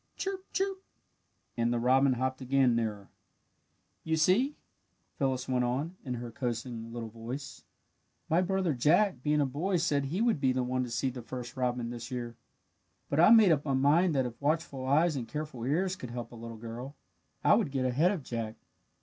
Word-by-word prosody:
"Chirp! 390 -1 -4
Chirp!" 385 0 -1 0.7
and 115 0 +1
the 120 - +1
robin 130 +3 +4
hopped 130 +2 -2
again 130 -2 +3
nearer. 105 -4 -3 0.9
"You 160 0 0
see," 220 - +3 0.6
Phyllis 130 -2 0
went 125 -1 +1
on, 140 +9 -2
in 125 -3 -3
her 120 0 -6
coaxing 115 -1 -4
little 115 -1 -5
voice, 120 +5 -7 0.6
"my 165 +3 +3
brother 185 -3 0
Jack, 155 - +3
being 150 +2 +2
a - - +3
boy, 165 +8 -1
said 145 -4 +1
he 160 +8 -2
would 230 -7 +2
be 130 -2 +3
the 130 0 0
one 130 +1 -1
to 125 - -5
see 125 +3 -1
the 125 0 -7
first 120 +1 -7
robin 125 -2 -1
this 120 +1 -7
year. 120 -2 -5 0.8
"But 145 - +1
I 175 - +8
made 220 -5 +8
up 150 -2 +2
my 140 -3 0
mind 150 +5 +3
that 130 -2 +2
if 120 +1 -7
watchful 145 -3 -1
eyes 155 +4 +3
and 120 -4 -4
careful 150 -3 -5
ears 180 +7 +1
could 125 -9 -8
help 120 -1 -6
a - - -10
little 115 0 -8
girl, 120 +5 -7 0.5
I - - +6
would - - +2
get 135 -2 -1
ahead 140 +8 +3
of 185 -7 -2
Jack. 115 -3 -4
130 Hz, 190 wpm, -30 LUFS, 120-160 Hz, 0.9 s, I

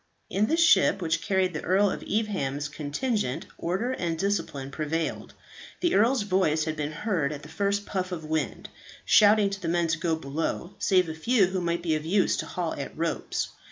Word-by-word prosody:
In 210 +2 +2
the 325 - +1
ship 315 - +5
which 165 -2 0
carried 185 -1 +1
the 150 - -3
Earl 195 +2 +3
of - - -5
Evesham's 150 -10 -1
contingent, 150 - -2
order 190 +9 -1
and 170 -10 -2
discipline 165 -8 -2
prevailed. 155 +2 -3 0.5
The 345 -1 +2
earl's 230 +3 +3
voice 185 -6 +2
had 155 0 -2
been 150 -1 -3
heard 165 -4 -1
at 150 -1 -7
the 150 - -11
first 200 +5 -1
puff 185 -2 -3
of 160 -3 -5
wind, 155 0 -2 0.4
shouting 210 -1 +5
to 200 0 -5
the 170 - -3
men 170 +1 +1
to 165 0 0
go 165 -1 +1
below, 160 +4 -3
save 185 -2 +3
a 160 - -4
few 205 +6 +3
who 185 0 -2
might 170 0 -1
be 165 -2 +1
of 155 -1 -1
use 185 +4 +2
to - - -3
haul 175 -3 -3
at 140 - -6
ropes. 165 +1 -2
175 Hz, 195 wpm, -27 LUFS, 155-200 Hz, 0.5 s, ship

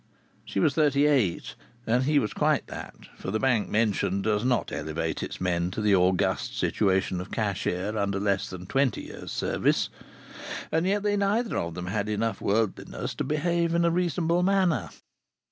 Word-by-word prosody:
She - - -3
was 140 - +3
thirty 145 -2 +3
eight, 130 -13 +1 0.3
and 125 +3 +2
he 150 +1 +3
was 105 -7 +1
quite - - +1
that - - -8 0.2
(for - - -6
the 110 +3 0
Bank 125 -5 +1
mentioned 100 -3 +1
does 105 -1 +1
not 125 -5 +1
elevate 80 +2 -3
its - - -5
men 90 -1 0
to 95 - -5
the 105 -1 +3
august 90 -1 +2
situation 95 -3 +1
of 90 - -8
cashier 100 -1 -2
under 100 -2 0
less 100 -1 0
than 90 -1 -8
twenty 135 +5 +1
years' - - -8
service), - - 0 0.8
and 160 +3 +1
yet 205 +1 +1
they 205 -1 +2
neither 210 +4 +1
of 85 -1 -2
them 90 - -5
had 100 +2 -2
enough 105 0 -1
worldliness 105 0 -1
to - - -3
behave 170 +2 0
in 170 0 +3
a 170 - +3
reasonable 175 0 +1
manner. 190 -3 +2
110 Hz, 175 wpm, -27 LUFS, 95-155 Hz, 0.8 s, was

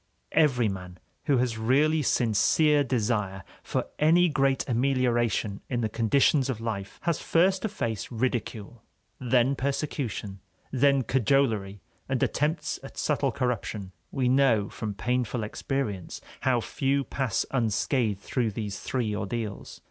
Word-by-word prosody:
Every 130 -7 +3
man 90 -2 -6 0.3
who 145 -4 +3
has 120 -2 0
really 145 +7 +3
sincere 145 +5 +3
desire 105 -6 -1 0.2
for - - -2
any 170 +3 +5
great 135 -3 +1
amelioration 120 -5 +1
in 120 -2 -1
the 110 - 0
conditions 130 +5 +2
of 120 -4 -2
life 100 -4 -4
has 170 -3 0
first 185 +3 +2
to 220 - -1
face 115 - -3
ridicule, 120 -2 -3 0.4
then 125 +2 +2
persecution, 130 -8 -3 0.3
then 140 0 +3
cajolery 115 -6 +1 0.3
and 130 -2 +1
attempts 150 +4 -1
at - - -11
subtle - - +1
corruption. 110 -5 -3 0.2
We 130 -2 0
know 125 -6 +3
from 105 -2 -5
painful 125 +1 -1
experience 105 - -3 0.2
how 125 -3 +2
few 140 +3 0
pass 130 -7 -1
unscathed 115 -3 0
through 115 0 -1
these 105 -2 -4
three 115 -5 -2
ordeals. 105 0 -5
125 Hz, 130 wpm, -27 LUFS, 110-135 Hz, 0.4 s, any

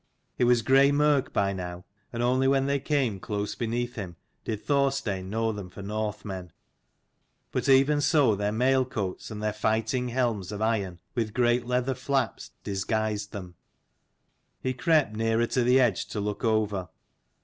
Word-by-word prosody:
It 125 - +4
was 120 -1 +4
grey 135 +3 +5
mirk 145 -2 +2
by 100 0 +1
now, 90 -1 -6 0.3
and 120 -1 -2
only 130 +2 +2
when 135 0 +3
they 140 0 +1
came 135 -8 0
close 105 +1 -3
beneath 120 +1 -2
him 95 -6 -6 0.3
did 110 -2 -4
Thorstein 135 -10 0
know 115 +2 0
them 100 -4 -7
for 100 +2 -10
Northmen. 100 -3 -4 1.0
But - - -1
even 140 +2 +5
so 145 -7 +4
their 105 +1 -1
mailcoats 125 -4 0
and 105 -1 -6
their 105 0 0
fighting 110 +3 0
helms 115 -6 -1
of 105 - -5
iron, 100 -6 -1
with 110 -3 -2
great 120 -1 +2
leather 125 +1 +1
flaps, 130 -3 -2
disguised 105 +1 -2
them. 90 -3 -7 1.1
He 130 - -2
crept 150 -4 +2
nearer 115 +1 +1
to 125 +1 0
the 125 +2 +5
edge 125 - +2
to 105 - -4
look 105 +3 -3
over. 105 -5 0
115 Hz, 160 wpm, -27 LUFS, 105-130 Hz, 1.1 s, grey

